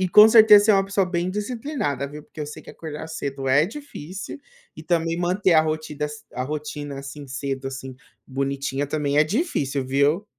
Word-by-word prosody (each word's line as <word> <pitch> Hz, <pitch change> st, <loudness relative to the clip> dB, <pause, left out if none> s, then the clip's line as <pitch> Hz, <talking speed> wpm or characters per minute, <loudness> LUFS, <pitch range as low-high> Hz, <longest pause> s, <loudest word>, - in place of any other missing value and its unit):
e, 185 Hz, -, +1 dB
com 210 Hz, +4 st, +9 dB
certeza, 215 Hz, -2 st, +8 dB
você 215 Hz, -, +6 dB
uma 195 Hz, -1 st, +3 dB
pessoa 195 Hz, 0 st, +1 dB
bem 175 Hz, 0 st, -1 dB
disciplinada, 210 Hz, -, -3 dB
viu, 150 Hz, +1 st, -9 dB
porque 155 Hz, -, -12 dB
eu 150 Hz, -, -3 dB
sei 150 Hz, -, -9 dB
que -, -, -11 dB
acordar 160 Hz, 0 st, -7 dB
cedo 135 Hz, -3 st, -4 dB
é 145 Hz, +5 st, +4 dB
difícil 200 Hz, -, -8 dB, 0.4 s
e -, -, -8 dB
também 165 Hz, -1 st, 0 dB
manter 180 Hz, 0 st, +2 dB
a 155 Hz, -, +7 dB
rotida 155 Hz, -1 st, -2 dB, 0.3 s
a 125 Hz, -, -3 dB
rotina, 145 Hz, -1 st, -5 dB
assim, 140 Hz, +1 st, -9 dB
cedo, 135 Hz, 0 st, -4 dB
assim, 130 Hz, -1 st, -7 dB, 0.3 s
bonitinha 140 Hz, +1 st, -2 dB
também 145 Hz, 0 st, 0 dB
é 155 Hz, -, +6 dB
difícil, 150 Hz, -, -1 dB
viu. 140 Hz, +8 st, +2 dB
150 Hz, 185 wpm, -23 LUFS, 140-190 Hz, 0.4 s, com